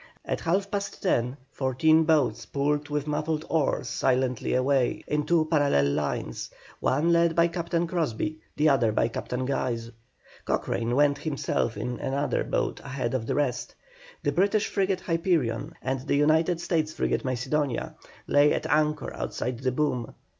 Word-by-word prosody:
At - - -2
half 195 +4 0
past 200 -1 -4
ten 125 -10 +2
the 130 - -9 0.2
fourteen 155 +5 +3
boats 145 -8 +2
pulled 145 +1 -1
with 150 -1 -1
muffled 155 +1 -1
oars 150 -4 +1
silently 125 0 0
away 130 0 +1
in 150 0 -1
two 165 -1 +3
parallel 145 - +2
lines, - - -3 0.3
one 155 +6 +2
led 170 -1 +3
by 170 0 +5
Captain 170 0 -1
Crosbie, 155 -3 -2 0.2
the 150 +1 +3
other 125 -6 +3
by 110 - +2
Captain 125 +2 -3
Guise. 120 -4 -2 0.5
Cochrane 120 +1 -1
went 145 0 +3
himself 140 -7 -1
in 125 +4 -3
another 140 +2 -1
boat - - -1
ahead 130 -3 -3
of 120 -4 -2
the - - 0
rest. 125 -4 -1 0.5
The 145 - +1
British 200 +7 +2
frigate 190 -2 0
Hyperion, 165 - 0
and 130 +1 -1
the 140 +2 -1
United 160 +4 +3
States 160 -3 0
frigate - - -1
Macedonia, 130 +1 -1 0.3
lay 145 +1 +4
at - - -3
anchor 150 0 +1
outside 125 -2 -3
the 130 0 0
boom. 125 -3 -1
145 Hz, 155 wpm, -27 LUFS, 130-160 Hz, 0.5 s, by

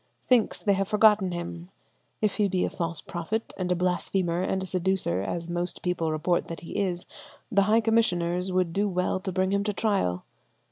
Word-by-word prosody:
Thinks 245 -4 +2
they 205 - +3
have 195 0 0
forgotten 210 -3 +4
him. 175 0 -6 0.5
If 210 -2 +1
he 210 -2 +3
be 185 -1 0
a - - -3
false 170 -3 -3
prophet 195 +6 -4
and 180 -1 -2
a - - +3
blasphemer 180 0 0
and 190 0 -1
a - - -3
seducer, 185 - 0
as 165 - -3
most 175 +1 -2
people 170 -3 0
report 155 +3 0
that 165 - -6
he 170 - -9
is, 180 -3 -1 0.5
the 200 -2 +4
high 225 +2 +5
commissioners 180 -5 +1
would 180 -2 +1
do 205 +2 +1
well 180 0 0
to 190 0 -4
bring 190 +1 0
him 200 0 +1
to 210 0 -1
trial. 195 - 0
185 Hz, 195 wpm, -27 LUFS, 175-200 Hz, 0.5 s, high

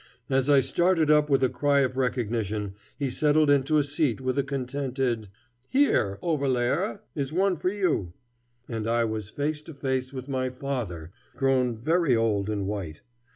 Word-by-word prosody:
As 135 +1 +2
I 140 -2 +6
started 165 +3 +2
up 150 0 +4
with 135 -1 +3
a - - +5
cry 140 +2 +2
of 130 -1 0
recognition, 110 -5 -1 0.2
he 140 -3 -2
settled 150 +2 +3
into 145 +2 +3
a 150 - +4
seat 145 -3 0
with 130 -1 -1
a 140 - +2
contented 130 -4 -2 0.4
"Here, 245 - +2
Overlaerer, 140 - 0
is 140 -2 -3
one 190 +3 +2
for 180 - -1
you," 180 - -1 0.5
and 115 -2 -4
I 115 0 +2
was 110 -2 -4
face 150 +4 -2
to 160 -1 -11
face 130 -2 -2
with 130 -1 -7
my 130 -2 -1
father, 120 - -5 0.2
grown 130 -3 +1
very 155 +2 +2
old 110 -3 +1
and 100 -2 -2
white. 95 -6 -5
130 Hz, 165 wpm, -26 LUFS, 115-145 Hz, 0.5 s, I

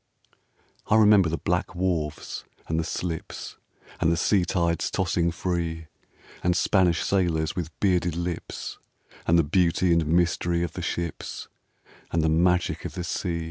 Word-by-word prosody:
I - - +3
remember 105 -5 +6
the 80 - -1
black 90 +2 -1
wharves 85 -5 -2 0.2
and 80 0 0
the - - 0
slips, 80 0 -5 0.4
And 80 - +3
the 85 - +1
sea 95 -1 +3
tides 85 -2 0
tossing 90 -2 +1
free; 85 -2 -3 0.5
And 90 0 +2
Spanish 90 -5 +3
sailors 85 -5 +1
with 85 -3 -3
bearded 90 -4 +2
lips, 85 0 -5 0.5
And 85 - +5
the 85 - +5
beauty 85 +2 +2
and 85 -2 +2
mystery 85 +1 +2
of 85 - -3
the - - -5
ships, 85 -3 -4 0.6
And 80 -1 +1
the 80 - +3
magic 90 +3 +2
of - - -6
the 90 - -3
sea. 85 0 -2
85 Hz, 150 wpm, -26 LUFS, 80-90 Hz, 0.6 s, remember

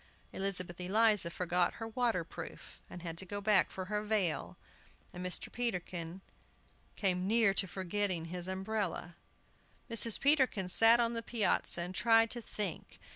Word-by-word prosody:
Elizabeth 185 -2 -1
Eliza 210 -1 +2
forgot 175 0 0
her 225 - -6
water 225 -5 -1
proof, 165 0 -10
and 175 - -10
had 165 -1 -5
to - - 0
go 205 +2 -4
back 205 -1 +3
for 185 - -6
her 210 +2 -2
veil, 185 - -1 0.6
and 180 - -7
Mr. 180 0 -1
Peterkin 180 -6 -3 0.7
came 185 -2 0
near 220 -2 +4
forgetting 190 -1 -1
his 175 +1 -5
umbrella. 190 -2 -3 0.8
Mrs. 230 -1 +4
Peterkin 265 -10 +3
sat 225 +5 +6
on 235 0 +1
the 230 - -3
piazza 220 -6 +1
and 180 +2 -5
tried 225 +1 +3
to 240 - -3
think. 205 -5 -5
195 Hz, 145 wpm, -33 LUFS, 180-225 Hz, 0.8 s, sat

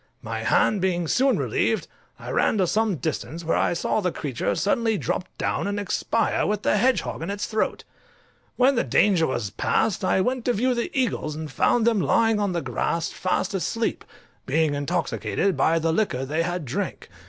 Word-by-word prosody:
My - - -4
hand 205 -3 +2
being 175 -3 0
soon 265 - +3
relieved, - - 0 0.3
I - - -7
ran - - +2
to 190 - +3
some 215 +2 +1
distance, 160 +3 -4
where 165 - +1
I - - +2
saw 175 +5 0
the 180 -2 0
creature 135 -8 -2
suddenly 220 - +1
drop 180 - -2
down - - -1
and 205 0 -2
expire 205 +3 0
with 210 0 -1
the - - +2
hedgehog 255 -7 +1
in 165 - -4
its 200 +1 -2
throat. 220 -1 -1 0.7
When 255 +2 +4
the 240 - +1
danger 185 -6 +3
was 105 -6 -2
past 220 -4 0
I 185 - +2
went 250 +4 -1
to 245 - +2
view 250 +4 +1
the 235 -1 -2
eagles, 190 - -1
and 155 -1 -6
found 225 - +2
them 230 -3 +3
lying 225 +9 +3
on 205 -2 0
the 170 -3 -2
grass 160 +6 -1
fast 185 +1 -1
asleep, 225 +4 -1 0.4
being 155 +2 +2
intoxicated 175 +5 -1
with 165 +3 +3
the 165 -1 +2
liquor 140 -10 0
they 155 +4 -1
had 175 -1 -2
drank. 175 +10 -4
185 Hz, 190 wpm, -24 LUFS, 160-220 Hz, 0.7 s, When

